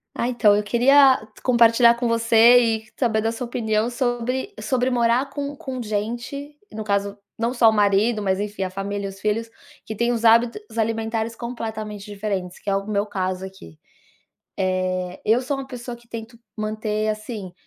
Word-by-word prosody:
Ah, 235 - -1
então, 225 -4 +4
eu 210 - 0
queria 260 +4 +5 0.2
compartilhar 235 -1 +5
com 240 0 -2
você 230 +1 +5
e 225 -2 0
saber 225 -4 +1
da 225 +1 0
sua 250 +2 -5
opinião 220 -1 0
sobre 250 - -2
sobre 255 -1 0
morar 245 +2 +2
com 285 0 -5
com 265 -2 -6
gente, 240 +7 -4
no 220 0 -5
caso, 200 -1 -1 0.2
não 235 +2 -1
só 240 -3 +5
o - - +2
marido, 210 +2 +2
mas 190 -1 0
enfim, 205 -1 -3
a 185 - -2
família 200 +2 -4
e - - -3
os 195 0 -12
filhos, 220 +2 -1 0.4
que 220 - -6
têm 235 +3 +1
os 235 -1 -1
hábitos 235 - +3
alimentares 225 0 -1
completamente 220 -4 -6
diferentes, 200 -3 -4
que - - -5
é 195 - +2
o 195 +1 -3
meu 205 -1 0
caso 185 -2 -3
aqui. 190 - -13 0.8
Eh, 185 -1 -1
eu 225 +3 +3
sou 270 +2 -2
uma 270 0 -6
pessoa 245 -2 -7
que 235 0 -22
tento 230 0 -9 0.2
manter, 215 0 -2
assim, 215 -3 -5
225 Hz, 180 wpm, -22 LUFS, 205-240 Hz, 0.8 s, queria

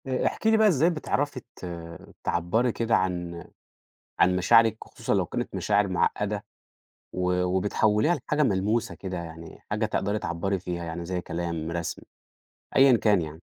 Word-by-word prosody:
آآ 130 -1 -1
احكِ - - -2
لي 220 0 +5
بقى 220 0 +5
إزاي 165 -3 +4
بتعرفي 145 -4 -1 0.2
ت - - -9 0.6
تعبرّي 100 +9 +1
كده 115 0 +1
عن 85 -2 -2 0.8
عن 90 - +5
مشاعرِك، 115 +4 +4
وخصوصًا - - -3
لو - - +2
كانت - - -4
مشاعر 105 -1 +2
معقّدة، 105 +3 0 0.7
و 90 0 0
وبتحوّليها 105 - +2
لحاجة 150 +1 0
ملموسة 110 +1 0
كده 95 -2 -5
يعني، 85 -1 -9
حاجة 105 +1 +1
تقدري 105 -1 -1
تعبّري 95 +3 -2
فيها، 90 -1 -4
يعني 85 +1 -5
زي 90 0 -2
كلام 85 -2 -4
رسم، 85 -1 -4 0.7
أيًا 135 -2 +7
كان 105 -4 +3
يعني؟ 80 +1 -7
95 Hz, 150 wpm, -26 LUFS, 85-115 Hz, 0.8 s, أيًا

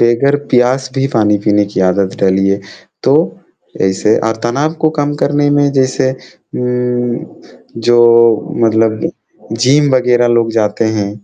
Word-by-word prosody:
बगैर 120 +5 +2
प्यास 130 +2 +1
भी 135 0 0
पानी 105 -2 +2
पीने 105 -1 +3
की - - -1
आदत 95 +1 -1
डालिए, 95 +1 +1 0.4
तो - - +2 0.7
ऐसे 95 +3 +1
अ, 110 - -1
तनाव 140 +7 -1
को 155 - +4
कम 145 0 -1
करने 145 0 +1
में 145 0 +2
जैसे 130 0 0
उम, 125 -1 -4 0.6
जो 120 +1 +2 0.7
मतलब 110 0 +1 0.5
जिम 130 +4 +2
वगैरह 125 -1 +2
लोग 115 -1 -1
जाते 105 +1 -1
हैं। 100 -1 -2
120 Hz, 135 wpm, -13 LUFS, 105-130 Hz, 0.7 s, को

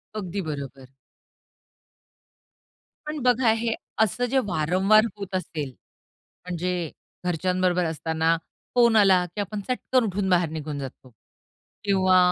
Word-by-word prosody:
अगदी 200 -2 -3
बरोबर. 135 -3 -7 2.2
पण 300 -1 -3
बघा 250 -2 +4
हे 230 0 0 0.3
असं 235 +4 0
जे 270 - +4
वारंवार 190 +6 +3
होत 195 -1 -5
असेल, 155 -6 -3 0.8
म्हणजे 180 -2 -2 0.3
घरच्यांबरोबर 180 +1 +1
असताना 160 +1 0 0.4
फोन 235 -2 +5
आला 190 -4 +5
की 205 - -1
आपण 205 +1 -4
चटकन 255 0 +1
उठून 195 -1 -1
बाहेर 175 -3 +3
निघून 155 -2 -5
जातो 130 -1 -8 0.7
किंवा 185 -2 +4
185 Hz, 110 wpm, -25 LUFS, 160-210 Hz, 2.2 s, फोन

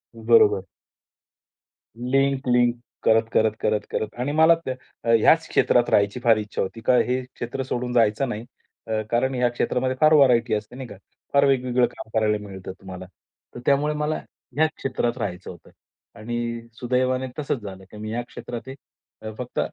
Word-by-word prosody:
बरोबर. 440 -2 +4 1.3
Link 135 +2 0
link, 120 -1 +3 0.3
करत-करत, 110 -1 +3
करत-करत 105 0 -2
आणि 135 +3 -1
मला 160 +2 +6
त्या 130 - -1 0.3
अ, 115 - -2
ह्याच - - +4
क्षेत्रात - - +3
राहायची 100 +4 +2
फार 115 -2 +5
इच्छा 105 -1 -3
होती 115 +4 -4
कारण 125 +2 +4
हे 125 +1 0
क्षेत्र 120 +3 -4
सोडून 125 -1 -3
जायचं 115 +2 +2
नाही. 110 +1 -5 0.4
अ, 110 -1 -1
कारण 130 +3 +1
ह्या 125 0 +2
क्षेत्रामध्ये 130 +2 -1
फार 155 0 +6
व्हरायटी 125 -6 +4
असते 105 +3 -3
नाही 130 -2 -7
का. 105 - -10 0.4
फार 140 0 +5
वेगवेगळं 125 -2 +2
काम - - -9
करायला 105 -1 +2
मिळतं 95 -1 -8
तुम्हाला. 95 -1 -8 0.5
तर 120 - -6
त्यामुळे 145 +2 +2
मला 150 +1 -1 0.4
ह्या 155 +2 +4
क्षेत्रात 125 -2 -2
राहायचं 95 -5 -5
होतं 85 - -15 0.5
आणि 115 +1 -4
सुदैवाने 130 +1 0
तसंच 140 -3 -2
झालं, 95 -2 -9
की 105 - -11
मी 110 0 -6
या 120 +2 -2
क्षेत्रात 120 0 -8
आहे 130 -4 -12
फक्त 125 -1 -5
120 Hz, 160 wpm, -24 LUFS, 110-130 Hz, 1.3 s, मला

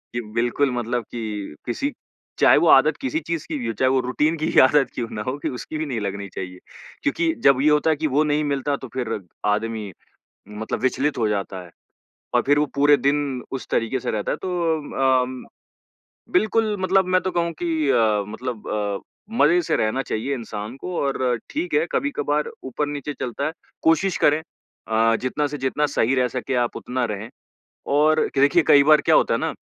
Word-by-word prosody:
ये 120 - -1
बिल्कुल 120 +4 +1
मतलब 120 0 -2
कि 105 -7 -5
किसी 275 - -2 0.5
चाहे - - +6
वो - - +3
आदत - - +6
किसी 280 +3 -1
चीज़ 165 - -4
की 155 - -3
भी 120 -4 -4
हो, 115 - -1
चाहे 130 +5 +2
वो 130 0 +3
रूटीन 150 +6 0
की 155 - -2
ही - - +5
आदत 135 +2 +5
क्यों 120 - -2
ना 105 - -4
हो 130 +2 -2
कि - - -2
उसकी 155 - -6
भी 155 - -2
नहीं 130 -6 -3
लगनी 100 0 -4
चाहिए। 90 -1 -6 0.4
क्योंकि 160 +3 +1
जब 135 -1 +5
ये 150 - +4
होता 150 +1 +3
है 160 - +3
कि 155 +1 -1
वो 145 +2 +2
नहीं 150 0 +1
मिलता 140 0 -1
तो 130 - -9
फिर 115 -4 -2 0.3
आदमी 110 0 -1 0.6
मतलब 105 +1 -4
विचलित 135 +3 0
हो 110 -2 +1
जाता 100 -2 -3
है 90 - -14 0.7
और 120 - +5
फिर 145 +1 +4
वो 150 - +3
पूरे 145 +1 +5
दिन 140 -2 0
उस 135 - -5
तरीके 115 +3 0
से - - -3
रहता 105 -1 -2
है - - -2
तो 160 -7 0
अम, 125 0 -5 0.9
बिल्कुल 220 - +2
मतलब 190 0 +3
मैं 185 - +4
तो 185 - -2
कहूँ 170 -1 -1
कि 160 -4 0
अ, 110 -5 +3
मतलब 115 +1 -6
अ, 105 -2 -2 0.4
मजे 175 -2 +5
से - - 0
रहना 110 +5 0
चाहिए 130 +3 -2
इंसान 110 -2 -6
को 180 +5 -6
और 130 -3 0
ठीक 325 +5 -3
है 460 - +3
कभी-कभार 150 - -1
ऊपर-नीचे 145 +2 -3
चलता 125 +3 -3
है। 155 - -1 0.3
कोशिश 165 +3 +3
करें 150 +2 +3 0.5
अ, 115 0 +3
जितना 135 +4 -1
से 145 +1 -5
जितना 135 +2 0
सही 135 -3 +1
रह 125 -1 +2
सकें 130 +1 -3
आप 120 -1 0
उतना 125 0 -2
रहें 105 0 -5 0.7
और 155 +1 +4
देखिए 145 +5 +4
कई 140 - +7
बार 150 0 +6
क्या - - +3
होता - - +3
है - - +1
ना, - - -2
135 Hz, 200 wpm, -23 LUFS, 115-150 Hz, 0.9 s, कई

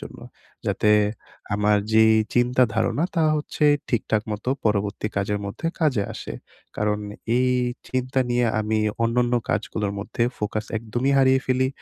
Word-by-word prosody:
জন্য। - - -10 0.5
যাতে 105 - +2 0.6
আমার 105 0 +3
যে 110 0 +6 0.3
চিন্তা 125 +1 +3
ধারণা 110 +8 +1
তা 165 - +3
হচ্ছে 150 0 -2 0.2
ঠিকঠাক 110 -2 0
মত 105 0 -5 0.2
পরবর্তী 105 -1 0
কাজের 100 +1 0
মধ্যে 100 +11 -5
কাজে 140 -10 +2
আসে। 65 - -7 0.4
কারণ 105 0 0 0.4
এই 125 0 +3 0.4
চিন্তা 130 +1 -1
নিয়ে 120 0 +2
আমি 110 +1 0 0.2
অন্যান্য 120 +1 +2 0.2
কাজগুলোর 105 -2 -2
মধ্যে 115 +3 -3 0.2
ফোকাস 105 0 -2
একদমই 120 +5 -1
হারিয়ে 130 0 +4
ফেলি 130 0 +2
115 Hz, 135 wpm, -23 LUFS, 105-130 Hz, 0.6 s, যে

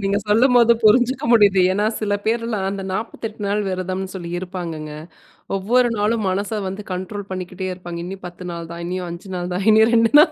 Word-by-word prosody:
நீங்க 200 0 +1
சொல்லும்போது 235 +1 +5
புரிஞ்சுக்க 245 +4 +4
முடியுது. 205 -4 +5
ஏன்னா 205 +2 +1
சில 205 -2 0
பேர்லாம் 225 -3 -1
அந்த 195 0 -4
48 220 +1 -5
நாள் 205 +1 0
விரதம்னு 185 0 -3
சொல்லி 175 -3 -6
இருப்பாங்கங்க. 170 -4 -6 0.6
ஒவ்வொரு 240 +6 +2
நாளும் 210 +1 +1
மனச 200 +3 -2
வந்து 195 +2 -5
கண்ட்ரோல் 190 +2 -5
பண்ணிக்கிட்டே 185 0 -5
இருப்பாங்க. 175 -2 -7
இன்னும் 190 +2 -7
10 175 +1 -10
நாள் 170 -1 -7
தான் 170 0 -7
இன்னியும் 180 0 -3
5 175 +3 -8
நாள் 180 0 -4
தான் 190 +2 -2
இனி 220 +1 +6
2 230 -1 +4
நாள் 300 - +6
195 Hz, 180 wpm, -21 LUFS, 180-220 Hz, 0.6 s, இனி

